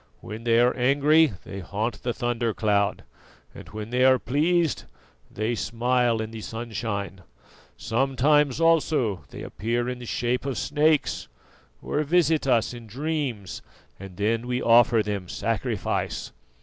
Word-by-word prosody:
When 110 Hz, +2 st, -8 dB
they 115 Hz, 0 st, +4 dB
are 125 Hz, +1 st, +3 dB
angry 145 Hz, +3 st, +4 dB
they 100 Hz, -, -7 dB
haunt 105 Hz, +5 st, -3 dB
the 120 Hz, -, -1 dB
thunder 120 Hz, -2 st, -2 dB
cloud, 100 Hz, -2 st, +1 dB, 0.5 s
and -, -, -11 dB
when 110 Hz, +1 st, -7 dB
they 125 Hz, +1 st, +2 dB
are 130 Hz, 0 st, +6 dB
pleased 155 Hz, +6 st, 0 dB, 0.4 s
they 110 Hz, +3 st, -2 dB
smile 120 Hz, 0 st, 0 dB
in 110 Hz, 0 st, -5 dB
the 110 Hz, -1 st, -7 dB
sunshine. 110 Hz, -4 st, -5 dB, 0.6 s
Sometimes 135 Hz, -, +2 dB
also 155 Hz, -, +2 dB
they -, -, -9 dB
appear 120 Hz, +3 st, -2 dB
in 125 Hz, 0 st, -4 dB
the 120 Hz, -, -9 dB
shape 120 Hz, +2 st, -1 dB
of 135 Hz, -4 st, -3 dB
snakes, 150 Hz, +2 st, +1 dB, 0.6 s
or 150 Hz, -, -1 dB
visit 160 Hz, -1 st, +2 dB
us 120 Hz, -2 st, +2 dB
in 120 Hz, -2 st, -10 dB
dreams, 130 Hz, -, -3 dB, 0.4 s
and 95 Hz, -2 st, -10 dB
then 115 Hz, +3 st, 0 dB
we 125 Hz, 0 st, -1 dB
offer 115 Hz, -1 st, +5 dB
them 100 Hz, -4 st, -4 dB
sacrifice. -, -, -2 dB
120 Hz, 140 wpm, -25 LUFS, 110-140 Hz, 0.6 s, are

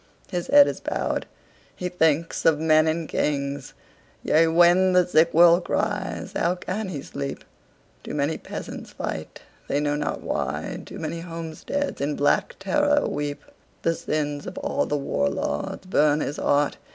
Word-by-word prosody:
His 175 Hz, -2 st, -2 dB
head 285 Hz, 0 st, +8 dB
is -, -, -3 dB
bowed. -, -, -2 dB, 0.5 s
He 180 Hz, -, -3 dB
thinks 165 Hz, -2 st, +1 dB
of 160 Hz, -2 st, +4 dB
men 155 Hz, 0 st, +4 dB
and 160 Hz, 0 st, -1 dB
kings. 140 Hz, -1 st, -2 dB, 0.5 s
Yea, 165 Hz, +1 st, +4 dB
when 175 Hz, +3 st, +5 dB
the 180 Hz, -1 st, +5 dB
sick 170 Hz, -1 st, +3 dB
world 170 Hz, +1 st, +6 dB
cries, 205 Hz, -2 st, -2 dB
how 175 Hz, +1 st, +1 dB
can 190 Hz, +3 st, -4 dB
he 145 Hz, -6 st, -5 dB
sleep? 140 Hz, 0 st, -5 dB, 0.6 s
Too -, -, -6 dB
many 145 Hz, +2 st, 0 dB
peasants -, -, -7 dB
fight, -, -, -6 dB, 0.3 s
they 140 Hz, -, 0 dB
know 145 Hz, 0 st, 0 dB
not 150 Hz, 0 st, -2 dB
why; -, -, -3 dB
Too -, -, -8 dB
many 165 Hz, +1 st, -4 dB
homesteads 165 Hz, -, -4 dB
in 145 Hz, +1 st, -1 dB
black 145 Hz, -, +1 dB
terror 290 Hz, +9 st, +2 dB
weep. 145 Hz, 0 st, -3 dB, 0.4 s
The 165 Hz, -, +2 dB
sins 145 Hz, -2 st, -3 dB
of -, -, -7 dB
all 285 Hz, 0 st, -1 dB
the 150 Hz, -, 0 dB
war 70 Hz, -, 0 dB
lords 70 Hz, -, -3 dB
burn 150 Hz, -4 st, +3 dB
his 145 Hz, -, -3 dB
heart. 145 Hz, 0 st, +1 dB
160 Hz, 160 wpm, -24 LUFS, 145-180 Hz, 0.6 s, head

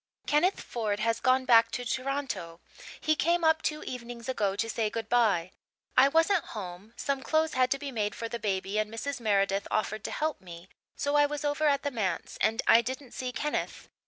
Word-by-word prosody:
"Kenneth 335 Hz, +6 st, +2 dB
Ford 215 Hz, -4 st, -2 dB
has 230 Hz, +1 st, +1 dB
gone 260 Hz, 0 st, +3 dB
back 230 Hz, -2 st, +6 dB
to 245 Hz, -, -3 dB
Toronto. 255 Hz, -10 st, -3 dB, 0.4 s
He 310 Hz, 0 st, +2 dB
came 340 Hz, +3 st, +1 dB
up 320 Hz, 0 st, +4 dB
two 305 Hz, 0 st, -2 dB
evenings 240 Hz, -1 st, -7 dB
ago 205 Hz, -7 st, 0 dB
to 225 Hz, -, -1 dB
say 225 Hz, -1 st, -1 dB
good 225 Hz, 0 st, -4 dB
bye. 205 Hz, -8 st, +2 dB, 0.4 s
I 260 Hz, +2 st, +7 dB
wasn't 325 Hz, +5 st, +3 dB
home 190 Hz, +3 st, -8 dB
some 275 Hz, -1 st, -1 dB
clothes 315 Hz, +2 st, +1 dB
had 255 Hz, 0 st, +3 dB
to 275 Hz, -, +1 dB
be 280 Hz, 0 st, -6 dB
made 210 Hz, -4 st, -2 dB
for 230 Hz, -, -4 dB
the 235 Hz, +1 st, -5 dB
baby 200 Hz, -1 st, -1 dB
and 215 Hz, 0 st, -1 dB
Mrs. 275 Hz, +5 st, -4 dB
Meredith 200 Hz, -3 st, +1 dB
offered 215 Hz, -1 st, -1 dB
to -, -, -3 dB
help 310 Hz, 0 st, -2 dB
me, 175 Hz, 0 st, -11 dB, 0.3 s
so 285 Hz, 0 st, -1 dB
I 290 Hz, 0 st, +5 dB
was 295 Hz, 0 st, -4 dB
over 290 Hz, +1 st, +1 dB
at 280 Hz, -1 st, +2 dB
the 285 Hz, -, -1 dB
manse, 195 Hz, -8 st, -3 dB
and 225 Hz, -, +2 dB
I 230 Hz, -, +7 dB
didn't 260 Hz, +2 st, -6 dB
see 255 Hz, -1 st, -4 dB
Kenneth. 295 Hz, +5 st, -3 dB
245 Hz, 205 wpm, -29 LUFS, 215-285 Hz, 0.4 s, I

